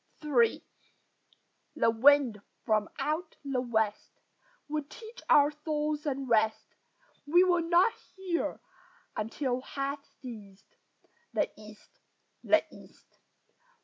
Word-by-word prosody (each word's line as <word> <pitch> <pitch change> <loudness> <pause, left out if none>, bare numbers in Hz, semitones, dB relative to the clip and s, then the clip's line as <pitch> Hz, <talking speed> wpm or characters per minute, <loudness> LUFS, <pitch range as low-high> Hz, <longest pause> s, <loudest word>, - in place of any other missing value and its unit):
III 240 -6 +3 1.1
The 230 - +3
wind 250 -2 +4 0.2
from 215 -2 +1
out 310 +4 -2
the 270 -2 -1
west 220 -4 -2 0.5
Would 300 -1 -3
teach 460 +6 -11
our 290 0 +6
souls 300 0 -2
unrest; 240 -6 +1 0.6
We 345 +5 +6
will 355 -2 +3
not 345 +6 +4 0.2
hear 370 -3 -2 0.6
until 245 +4 -2
hath 275 +1 -4 0.2
ceased 210 -6 -11 0.6
The - - 0
East, 210 0 -15 0.4
the - - +4
East! - - -18
275 Hz, 100 wpm, -30 LUFS, 225-305 Hz, 1.1 s, our